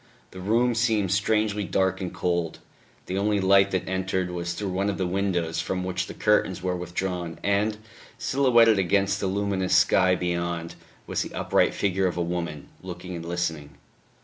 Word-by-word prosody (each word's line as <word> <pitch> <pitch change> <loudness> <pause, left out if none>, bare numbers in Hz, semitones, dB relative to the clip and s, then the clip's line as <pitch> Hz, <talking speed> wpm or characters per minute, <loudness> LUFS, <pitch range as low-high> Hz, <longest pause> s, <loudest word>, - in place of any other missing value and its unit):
The 95 - -10
room 115 +6 +2
seemed 110 -5 +1
strangely 105 +1 +1
dark 95 +1 0
and 90 - -3
cold; 85 -2 -1 0.5
the 95 +1 -2
only 105 0 +1
light 95 +1 +5
that 95 -2 -2
entered 95 -1 -1
was 85 -1 -3
through 95 +2 -3
one 100 +2 0
of 100 - -2
the 95 - -1
windows 90 -3 -1
from 90 -1 -3
which 90 0 -2
the - - -8
curtains 95 -4 +1
were 90 -1 0
withdrawn, 90 -1 -4
and, 100 +2 +1 0.4
silhouetted 120 -6 +4
against 100 +1 +1
the 100 - -1
luminous 95 -1 0
sky 90 0 +4
beyond, 85 -1 -2 0.3
was - - -2
the - - -6
upright - - +2
figure 95 -1 +1
of 90 - -3
a 85 - +1
woman, 85 -4 -4
looking 90 0 -7
and 85 -1 -6
listening.... 80 -4 -3
95 Hz, 175 wpm, -25 LUFS, 90-100 Hz, 0.5 s, light